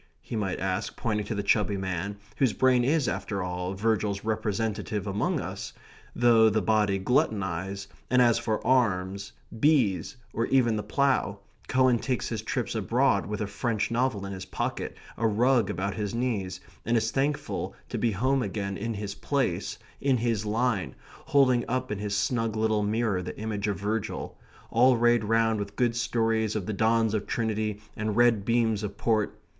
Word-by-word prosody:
he - - -7
might 95 -4 -1
ask, 95 -1 -2
pointing 105 -3 -1
to 105 +2 -4
the 100 - -2
chubby 100 0 +2
man, 95 +1 -3 0.2
whose 130 -6 +2
brain 130 -2 +3
is, 145 +1 +2
after 100 -3 -2
all, 90 +1 -3
Virgil's 105 -1 0
representative 110 -1 -2
among 100 0 0
us, - - -6 0.4
though 115 -2 +5
the 110 +1 +1
body 105 0 +2
gluttonize, 95 -3 0 0.2
and 125 - +4
as 120 -2 +5
for 110 -2 -2
arms, 100 -5 +1 0.3
bees, 135 -4 +2 0.2
or 115 - 0
even 120 -4 +3
the 105 - -1
plough, 105 -2 +1 0.3
Cowan 130 -2 +3
takes 130 0 -2
his 110 -3 -3
trips 110 - -2
abroad - - +2
with 105 +1 -3
a - - 0
French 110 +2 -2
novel 115 -4 0
in 100 - -5
his 95 -1 -6
pocket, - - -3 0.2
a 115 - +2
rug 115 0 +3
about 100 -1 -2
his 105 0 -3
knees, 100 -7 -2 0.2
and 115 0 +2
is 115 0 0
thankful 140 +3 -1
to - - -3
be 120 - +2
home 130 +7 +1
again 100 -2 -3
in 115 +2 -3
his 100 -1 -4
place, 130 -7 -1 0.2
in 135 -2 +3
his 115 -2 -1
line, 110 -2 0 0.3
holding 130 -3 +4
up 130 0 -2
in 105 - -2
his 105 0 -2
snug 115 0 0
little 110 -1 +1
mirror 105 -2 0
the 90 - -7
image 105 -1 -2
of 100 -3 -1
Virgil, 105 +2 -3 0.4
all 125 +2 +5
rayed 120 -1 +3
round 110 0 +2
with 100 0 -5
good 120 0 +1
stories 115 -2 0
of 105 -4 -2
the 110 - -3
dons 110 +1 +2
of 105 -2 -2
Trinity 110 -2 -1 0.2
and 110 0 -2
red 120 -4 +4
beams 115 -2 +1
of 100 -1 -5
port. 110 -2 0
110 Hz, 175 wpm, -27 LUFS, 100-120 Hz, 0.4 s, though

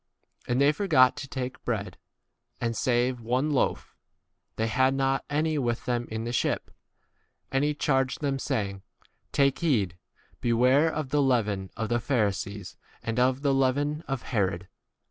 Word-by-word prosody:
u - - 0
And 125 - +1
they 140 +1 +5
forgot 150 -7 +4
to 135 - -6
take 130 -1 -5
bread, - - -3 0.6
and, 115 -1 -1
save 125 -1 +1
one 125 +6 0
loaf, 140 - 0 0.6
they 110 - 0
had 130 +4 +2
not 135 0 +1
15 145 - -1
[any] 155 0 +1
with 120 -3 -1
them 120 -1 -1
in 110 0 -4
the 120 - -3
ship. - - -1 0.8
And 135 +1 +1
he 150 0 +1
charged 135 -3 +1
them, 140 -2 -1
saying, 100 -8 -2 0.5
Take 140 -1 +2
heed, 110 - +1 0.4
beware 125 +7 +3
of 155 -3 -3
the 145 +2 +2
leaven 105 -8 +1
of 110 -1 -2
the 120 0 +1
Pharisees 100 - -2 0.3
and 115 +1 -2
of 130 +2 +2
the 140 -1 +3
leaven 140 +3 +1
of 135 -3 -2
16 - - -11
Herod. 95 -2 -1
130 Hz, 165 wpm, -27 LUFS, 115-140 Hz, 0.8 s, they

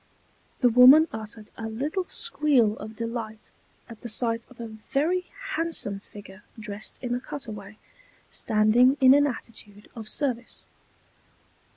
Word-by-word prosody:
The 250 - +5
woman 255 +7 +8
uttered 220 -1 -8
a 225 0 -5
little 295 - -3
squeal 290 - +2
of 215 +1 -8
delight 230 -1 -6 0.4
at 230 -2 -12
the 240 - -7
sight 230 +1 -1
of 255 - -18
a 235 - -5
very 285 +11 -2 0.2
handsome 325 -12 -1
figure 200 -1 -13 0.2
dressed 210 -1 -5
in 245 -1 -2
a 245 - -1
cutaway, 215 -6 -8 0.5
standing 235 +4 +3
in 260 -1 +7
an 290 +1 +4
attitude 215 -4 -7
of 220 -2 -7
service. 250 -5 -3
230 Hz, 135 wpm, -26 LUFS, 215-265 Hz, 0.5 s, woman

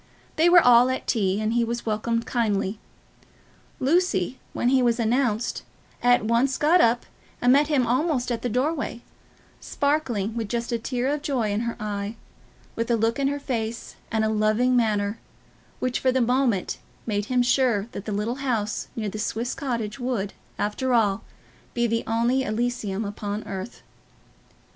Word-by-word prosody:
They 330 +2 +4
were 350 -1 +7
all 245 +1 +7
at 260 - -2
tea, 200 -4 +1
and 215 +1 0
he 240 0 +2
was 235 +1 -3
welcomed 230 +1 -1
kindly. 210 -3 -1 1.0
Lucy, 265 - +1
when 240 - 0
he 265 0 +4
was 240 -1 +2
announced, 235 -1 0 0.4
at 245 -3 +4
once 240 +4 +2
got 335 +4 +4
up 235 +1 +3 0.3
and 245 +1 +4
met 290 +2 +4
him 285 -5 +2
almost 255 0 0
at 235 - -2
the 245 - -1
doorway, 255 0 -1 0.6
sparkling 245 -8 -1
with 225 -3 -3
just 235 0 -2
a 235 - 0
tear 245 +2 -2
of 290 +1 -1
joy 250 -8 -1
in 205 - 0
her 235 0 -2
eye, 205 0 -3 0.6
with 230 +1 -2
a 235 - +4
look 225 +3 0
in 275 - +2
her 285 +1 -1
face, 230 -4 -4 0.2
and 220 -1 +1
a - - +1
loving 215 +4 +2
manner, 215 -2 +1 0.6
which 255 -1 -1
for 260 - +2
the 260 - +1
moment 245 -5 +1 0.3
made 205 -2 -1
him 250 +2 +2
sure 245 -5 +2
that 200 - -7
the 215 - -4
little 210 +5 -2
house 220 -6 -1
near 220 -2 -2
the 210 +2 -5
Swiss 230 +3 -2
Cottage 235 -4 -3
would, 240 -6 -2 0.2
after 245 +5 0
all, 205 -4 +2 0.5
be 240 0 +2
the 230 0 0
only 235 +4 +2
Elysium 220 -3 -2
upon 205 +1 -4
earth. 195 +4 -7
235 Hz, 170 wpm, -25 LUFS, 215-255 Hz, 1.0 s, were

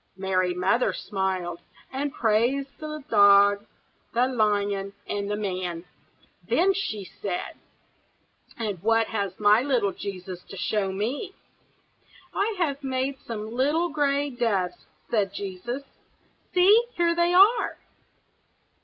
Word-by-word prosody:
Mary 185 -1 +1
Mother 195 +7 +2
smiled, 185 -4 -2 0.3
and 280 +2 -2
praised 245 +5 0
the 305 -1 -6
dog, 200 0 +5 0.5
the 245 +2 +4
lion, 205 -4 0
and 200 0 -3
the 205 - 0
man. 180 -4 -3 0.6
Then 385 +3 +4
she 215 - -3
said, 185 -1 -5 1.0
"And 205 -6 -3
what 225 +2 +2
has 200 -4 -3
my 210 +2 +5
little 250 -7 +1
Jesus 185 -2 -7
to 195 - -10
show 195 0 0
me?" 250 - -3 1.0
"I 415 +2 0
have 285 -5 -1
made 265 0 -2
some 220 -1 -6
little 295 +8 +1
gray 285 -1 0
doves," 205 -8 -1 0.2
said 200 -4 +1
Jesus. 205 +7 -5 0.7
"See! 395 +6 +6
here 340 -1 +2
they 345 +1 +2
are!" 405 +6 +5
220 Hz, 120 wpm, -26 LUFS, 195-280 Hz, 1.0 s, See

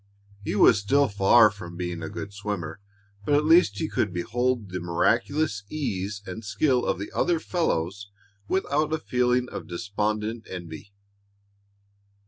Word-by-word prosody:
He 105 - -2
was 105 - +6
still 140 +8 +3
far 100 +2 +5
from 85 -4 -10
being 90 -1 -4
a 80 - -5
good 100 0 -7
swimmer, 100 -5 -5 0.4
but 145 +7 +2
at 150 +1 +2
least 165 +3 +5
he 160 - -1
could 105 - -1
behold 115 +4 -1
the 90 - -3
miraculous 110 - 0
ease 105 -8 -3
and 95 +5 -7
skill 125 +5 +1
of - - +1
the 100 +2 -6
other 175 -2 +1
fellows 100 - -2 0.4
without 155 -5 0
a - - +2
feeling 125 -3 +1
of - - -7
despondent 105 +4 -3
envy. 85 +1 -8
105 Hz, 145 wpm, -26 LUFS, 95-130 Hz, 0.4 s, was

